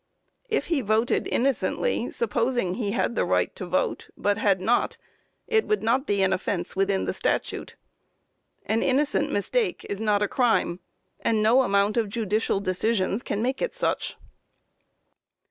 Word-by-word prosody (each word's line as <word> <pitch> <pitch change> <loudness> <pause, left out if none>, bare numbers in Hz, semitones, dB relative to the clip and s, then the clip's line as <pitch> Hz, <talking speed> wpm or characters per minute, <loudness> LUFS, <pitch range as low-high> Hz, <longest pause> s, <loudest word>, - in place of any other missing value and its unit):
If 445 - 0
he 325 -5 0
voted 220 +2 +1
innocently 275 - 0
supposing 240 - 0
he 210 -1 -2
had 235 - 0
the - - +2
right - - 0
to - - -6
vote, - - -1
but 205 +1 0
had 200 -3 +3
not, 225 +6 +1 0.5
it 440 -2 +1
would 425 - 0
not 255 +5 +1
be 200 -1 +2
an 190 0 +3
offence 185 -1 -2
within 195 0 +1
the - - -1
statute. - - -2 0.9
An 220 +1 +1
innocent 275 +2 +1
mistake 445 -8 -1
is 200 +1 -3
not 210 -1 +2
a - - +1
crime, 225 -7 +1 0.4
and 220 -2 +1
no 235 +5 +5
amount 200 -2 +2
of 225 -3 +1
judicial 215 -1 0
decisions 200 +2 0
can 205 -1 -2
make 260 +2 -1
it - - -2
such. - - -1
220 Hz, 155 wpm, -25 LUFS, 200-260 Hz, 0.9 s, no